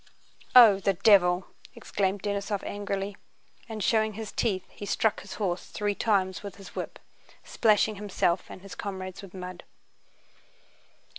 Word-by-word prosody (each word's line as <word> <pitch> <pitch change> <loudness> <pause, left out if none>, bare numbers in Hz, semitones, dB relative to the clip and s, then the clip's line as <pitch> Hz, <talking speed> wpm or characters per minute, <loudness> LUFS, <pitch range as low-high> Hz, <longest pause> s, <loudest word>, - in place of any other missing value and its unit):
"Oh, 225 -6 +9
the 195 0 +1
devil!" 180 -2 +5 0.3
exclaimed 195 0 -2
Denísov 200 0 -2
angrily, 200 -1 -4 0.5
and 215 -2 -4
showing 220 +1 +2
his 215 0 -6
teeth 190 -5 -1
he - - -11
struck 210 +1 +1
his 200 - -9
horse 185 -4 -2
three 205 -1 -1
times 195 -3 0
with 200 -3 -8
his 195 -1 -13
whip, - - -5 0.5
splashing 215 -1 +2
himself 190 -3 0
and 185 - -10
his 195 - -9
comrades 190 -2 -6
with 195 -2 -12
mud. 180 -1 -7
200 Hz, 140 wpm, -28 LUFS, 190-210 Hz, 0.5 s, Oh